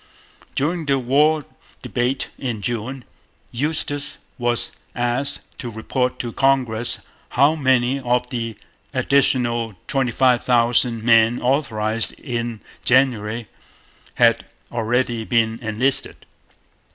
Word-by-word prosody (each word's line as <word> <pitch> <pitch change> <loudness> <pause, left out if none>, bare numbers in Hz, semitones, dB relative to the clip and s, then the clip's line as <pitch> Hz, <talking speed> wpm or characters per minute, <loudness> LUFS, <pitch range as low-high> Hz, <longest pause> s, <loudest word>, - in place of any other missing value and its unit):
During 160 +2 -1
the 140 -1 +3
war 145 +4 +2 0.4
debate 125 +2 -1
in 115 -6 -3
June, 120 +3 -3 0.5
Eustis 145 +2 -1 0.2
was 120 0 0 0.2
asked 120 +4 -1 0.2
to 120 - -4
report 125 +3 -2
to 120 - -4
Congress 125 -4 +1 0.4
how 140 +4 +6
many 130 -3 +2
of 125 -1 0
the 115 -3 -3 0.4
'additional' 120 -5 +2
twenty 135 -3 0
five 125 0 +3
thousand 120 -1 +2
men 115 0 +5
authorized 115 -5 0
in 120 -4 -4 0.2
January 120 -3 +2 0.7
had - - +4 0.3
already 120 0 0
been 115 -1 +1
enlisted. 120 +4 0
125 Hz, 105 wpm, -21 LUFS, 115-135 Hz, 0.7 s, how